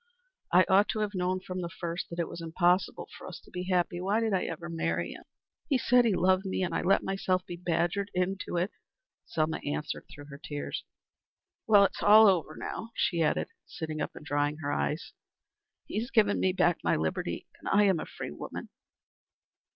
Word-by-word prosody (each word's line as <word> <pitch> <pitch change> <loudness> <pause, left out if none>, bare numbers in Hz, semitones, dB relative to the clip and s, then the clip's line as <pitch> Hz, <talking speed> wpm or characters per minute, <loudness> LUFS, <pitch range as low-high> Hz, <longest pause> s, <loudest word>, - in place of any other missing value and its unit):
"I 180 +1 +6
ought 195 +2 +5
to 215 - -1
have 210 -1 -1
known 185 0 -1
from 185 0 -5
the 170 - -4
first 170 +1 -5
that 170 - -7
it 170 - 0
was 170 - -8
impossible 175 +3 +1
for - - -10
us - - -8
to - - -19
be 180 0 -4
happy. 175 -1 +1
Why 200 +4 +1
did 225 -2 0
I 190 - +1
ever 170 +1 -5
marry 85 - -1
him? - - -11 0.4
He 275 - +4
said 250 0 +4
he 215 -5 +3
loved 185 +1 +3
me, 190 -1 -1
and 180 - -2
I - - 0
let 190 +2 +3
myself 185 -1 0
be 175 - -6
badgered 175 +3 0
into 185 0 -1
it," 180 +4 0 0.6
Selma 160 -1 0
answered 145 +1 -4
through 145 - -11
her 140 - -9
tears. 145 -1 -5 0.8
"Well, 205 -2 +7
it's - - -3
all 215 +2 +8
over 170 -5 +2
now," 225 - -5
she 170 -3 +1
added, 155 - +1 0.2
sitting 155 -2 -5
up - - -3
and - - -10
drying 145 +1 0
her 145 - -1
eyes. 150 +2 -2 0.7
"He - - -3
has 235 +3 -4
given 215 -5 +3
me 185 - +3
back 175 -2 +2
my - - +2
liberty. 80 0 -2 0.3
I 205 +1 +5
am 190 -5 +3
a - - -5
free - - -7
woman." 75 - -7
180 Hz, 200 wpm, -29 LUFS, 165-195 Hz, 0.8 s, all